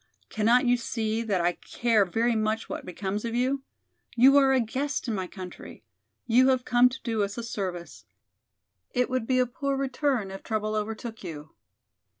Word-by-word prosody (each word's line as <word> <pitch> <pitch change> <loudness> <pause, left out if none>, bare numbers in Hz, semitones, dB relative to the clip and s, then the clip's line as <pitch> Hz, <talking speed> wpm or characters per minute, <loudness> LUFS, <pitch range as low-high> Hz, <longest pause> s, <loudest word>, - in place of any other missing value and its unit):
Cannot 235 +4 +3
you 245 0 +4
see 225 -1 -2
that 205 -6 0
I 175 +1 +2
care 220 +3 +1
very 230 +6 +1
much 215 0 -1
what - - -6
becomes 195 +3 -3
of 235 0 -3
you? 260 +3 +1 0.5
You 260 +3 +6
are 270 -1 +5
a 265 - +4
guest 265 +5 -2
in 230 - -1
my 190 -3 -3
country; 185 -1 -10 0.4
you 250 +3 +5
have 255 -1 +2
come 245 +1 +5
to 255 - -8
do 225 -3 -1
us 200 +1 -2
a 235 - -3
service. 175 - -5 0.9
It 250 +1 +1
would 255 -3 -1
be 255 - +2
a 255 - +4
poor 275 +3 -2
return 265 -6 -1
if 195 - -8
trouble 215 -1 -2
overtook 220 +1 -4
you." 155 -3 -8
230 Hz, 180 wpm, -27 LUFS, 205-250 Hz, 0.9 s, You